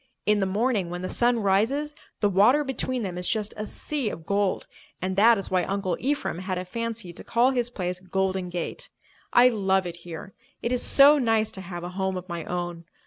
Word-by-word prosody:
In 210 0 +3
the 195 - +1
morning, 205 -2 0
when 175 +1 -5
the 185 - -3
sun 240 -1 +2
rises, 235 +10 +1 0.3
the 205 - +4
water 210 +10 +4
between 255 -2 -2
them 180 -3 -4
is 180 - -1
just 215 -2 -1
a 210 0 -5
sea 280 -2 -2
of 165 -5 -8
gold, 200 0 0 0.3
and 185 +1 -2
that 225 +3 +6
is 195 - -5
why 185 -1 +2
Uncle 195 -2 -1
Ephraim 275 -9 -1
had 185 0 -3
a 180 - -4
fancy 230 -2 -5
to - - -10
call 240 +3 +3
his 245 -2 0
place 180 -5 -4
Golden 190 0 -1
Gate. 175 -1 -5 0.4
I 245 +1 +7
love 190 -4 +1
it 175 -1 -6
here. 175 +3 -9 0.3
It 235 - -1
is 250 - +1
so 285 +2 +7
nice 225 -3 +1
to 190 - -7
have 175 -1 -7
a 175 - -4
home 190 0 -2
of 180 0 -7
my 170 -3 -5
own. 175 -1 -4
195 Hz, 215 wpm, -26 LUFS, 180-235 Hz, 0.4 s, I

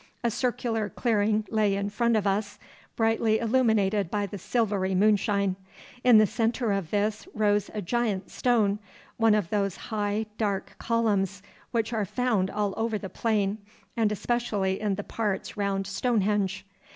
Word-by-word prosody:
A 235 - +2
circular 230 -2 -1
clearing 215 0 +1
lay 210 -3 +2
in 200 +1 -2
front 235 +1 +2
of 210 - -1
us, 205 +1 -1 0.4
brightly 225 -1 +2
illuminated 220 -5 +2
by 205 +1 -1
the 200 0 -7
silvery 200 -3 0
moonshine. 200 -1 +2 0.5
In 245 -3 +7
the 215 - +7
centre 230 +2 0
of 195 -5 -1
this 210 - -1
rose 205 -1 +2
a 210 - -3
giant 215 -1 -1
stone, 215 -5 +2 0.4
one 225 -2 +4
of 205 -6 -1
those 200 -3 0
high 210 0 -2
dark 200 -3 -2
columns 200 -4 0 0.3
which 230 0 -1
are 220 -2 0
found 220 -3 0
all 205 -1 -1
over 225 -1 0
the 195 -2 -7
plain, 210 -2 0 0.4
and 225 -3 +2
especially 210 -3 -1
in 210 -2 0
the 205 - -5
parts 205 -3 -3
round 200 -1 -1
Stonehenge. 200 -2 0
210 Hz, 150 wpm, -27 LUFS, 200-225 Hz, 0.5 s, In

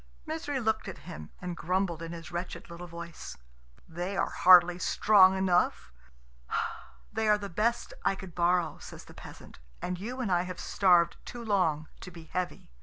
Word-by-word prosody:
Misery 310 -3 -3
looked 220 -2 0
at - - -6
him 75 +1 -8
and 180 -1 -5
grumbled 180 -1 -1
in 165 0 -6
his 170 0 -8
wretched 175 0 -6
little 175 +1 -8
voice, 170 - -8 0.5
"They 175 +4 -4
are - - 0
hardly 180 -1 +6
strong 190 -1 +5
enough," 180 - +1 1.2
"They 220 0 0
are 210 0 +5
the 200 -1 -6
best 230 +7 -1
I 195 - +2
could 190 -2 -10
borrow," 175 -1 +1
says - - -11
the - - -14
peasant; - - -12 0.2
"and 180 0 -4
you 245 +6 -5
and 230 -7 -1
I 175 -1 +3
have 180 -1 -6
starved 175 -3 +3
too 240 -1 -8
long 165 -7 +1
to - - -9
be 170 -2 -12
heavy." 180 - -5
180 Hz, 175 wpm, -29 LUFS, 170-200 Hz, 1.2 s, hardly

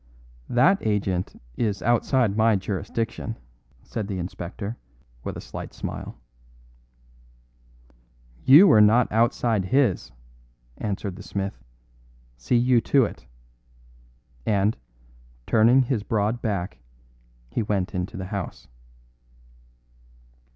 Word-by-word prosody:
"That 170 +11 +4
agent 100 -4 -1 0.2
is 100 -5 -1
outside 120 -2 +2
my 110 0 +4
jurisdiction," 105 +4 -3 0.5
said 105 -3 -5
the 100 -2 -4
inspector 95 +4 -5 0.5
with - - -5
a - - -7
slight - - -8
smile. - - -6 2.3
"You 155 +9 +8
are 110 - +7
not 110 +3 +4
outside 115 -2 +1
His," 120 - +1 0.7
answered 100 -2 -3
the - - -9
smith; 95 -7 -5 0.7
"see - - 0
you 120 0 +4
to 135 0 +3
it," 65 - -9 1.2
and, 105 - +1 0.7
turning 120 +4 +5
his 120 -3 -1
broad 110 +2 -1
back, 90 - -3 0.7
he - - -1
went 100 -3 -1
into 95 +4 -4
the 95 - -5
house. 100 -4 -5
105 Hz, 100 wpm, -24 LUFS, 95-120 Hz, 2.3 s, You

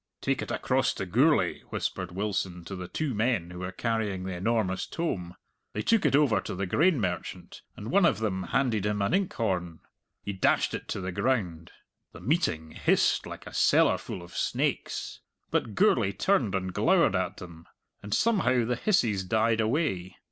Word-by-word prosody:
"Take - - -1
it - - -5
across - - +1
to - - -3
Gourlay," 115 - +3
whispered 90 -2 -3
Wilson 95 -2 -3
to 95 - -6
the 90 -1 -6
two 150 - -2
men 105 -6 0
who 90 - -8
were 90 0 -4
carrying 105 -2 -2
the 95 0 -4
enormous 95 0 0
tome. 90 - -3 0.4
They 105 - -2
took 225 -2 +3
it - - +3
over 145 -6 +3
to - - -5
the 100 +2 -2
grain 155 - +3
merchant, 90 -5 -4 0.2
and 110 +4 -6
one 200 -3 +5
of - - +1
them 100 -4 -1
handed 115 -2 +1
him 105 -1 0
an 100 - 0
inkhorn. 95 - -1 0.4
He 100 - -3
dashed 95 - +2
it - - -5
to 100 - -3
the 90 0 -3
ground. 90 -8 -1 0.4
The - - -10
meeting 80 - 0
hissed - - +2
like - - -9
a - - -10
cellarful 90 - +2
of 85 - -13
snakes. - - -2 0.3
But 105 - -1
Gourlay 100 -1 +3
turned 110 - +1
and 95 -1 -2
glowered - - +3
at - - -1
them, 85 -2 -11 0.3
and 100 - -9
somehow 130 - +2
the 125 +1 -1
hisses 115 - +1
died 110 +3 +2
away. 110 - -1
100 Hz, 175 wpm, -28 LUFS, 90-125 Hz, 0.4 s, one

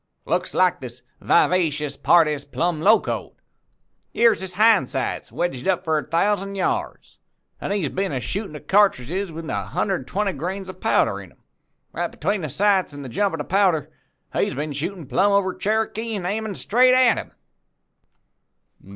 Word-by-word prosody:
'Looks - - -2
like 185 -1 +3
this 125 -2 -9 0.2
vivacious 150 -5 +2
party's 150 -2 +3
plumb 165 +2 -2
locoed. 215 +6 +2 0.8
Yere's 230 -4 +3
his 190 -1 -5
hind 210 - +4
sights 135 -1 -3
wedged 170 -7 -3
up 180 -2 +1
for 160 -3 +1
a - - -5
thousand 195 +3 0
yards, 190 - -3 0.4
an' - - -4
he's 200 -8 -1
been 195 +3 -2
a 135 - -2
shootin' 195 - -5
of 150 - -10
cartridges 190 -1 +2
with 165 0 -7
a 100 - -2
hundred 185 - -1
an' - - -12
twenty 195 +3 -1
grains 185 +6 -5
of 185 - -10
powder - - +1
into - - -15 0.6
'em. - - -2
Between 205 -2 -2
the 155 - -4
sights 190 +1 +1
an' 145 - -7
the 130 - -7
jump 195 - 0
of - - -6
the 150 - -3
powder, 170 -4 +1 0.4
he's - - 0 0.2
shootin' 170 +3 -4
plumb 200 +9 +2
over 195 -2 +2
Cherokee 220 +2 -2
an' 190 -3 -4
aimin' 210 +1 -2
straight 255 +3 +4
at 255 -2 +4
him.' - - -9
185 Hz, 170 wpm, -22 LUFS, 150-200 Hz, 0.8 s, hind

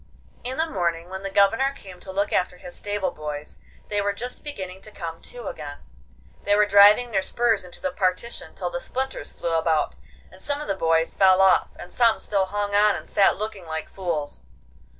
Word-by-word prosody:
In 255 +2 -4
the 320 - +2
morning 170 - -2
when 190 0 -6
the 195 - -4
Governor 225 +8 +3
came 190 -9 -12
to 190 - -9
look 200 +2 -1
after 180 0 0
his 180 0 -9
stable 205 -1 -2
boys 150 -1 -7 0.3
they 205 -1 +1
were 200 0 0
just 245 +5 -6
beginning 190 -10 -7
to 215 - -11
come 165 -4 -7
to 245 -1 -8
again. 145 -2 -6 0.7
They 205 - +3
were 210 0 +5
driving 205 +4 +6
their 195 -3 +2
spurs 230 0 +1
into 180 - -12
the 280 - -2
partition 185 +2 -2
till - - -3
the - - -4
splinters 265 - -3
flew 170 - -3
about, 160 - +1 0.4
and 185 - -15
some 285 +5 -1
of 300 - -6
the 195 - +1
boys 165 -3 +1
fell 190 -1 +5
off, 190 -1 +5
and 175 - -10
some 230 -2 +4
still 195 -2 0
hung 205 +1 -2
on 210 0 +5
and - - -7
sat 195 - +3
looking 205 -4 -5
like 160 0 -4
fools. 165 -6 -3
195 Hz, 205 wpm, -24 LUFS, 180-215 Hz, 0.7 s, driving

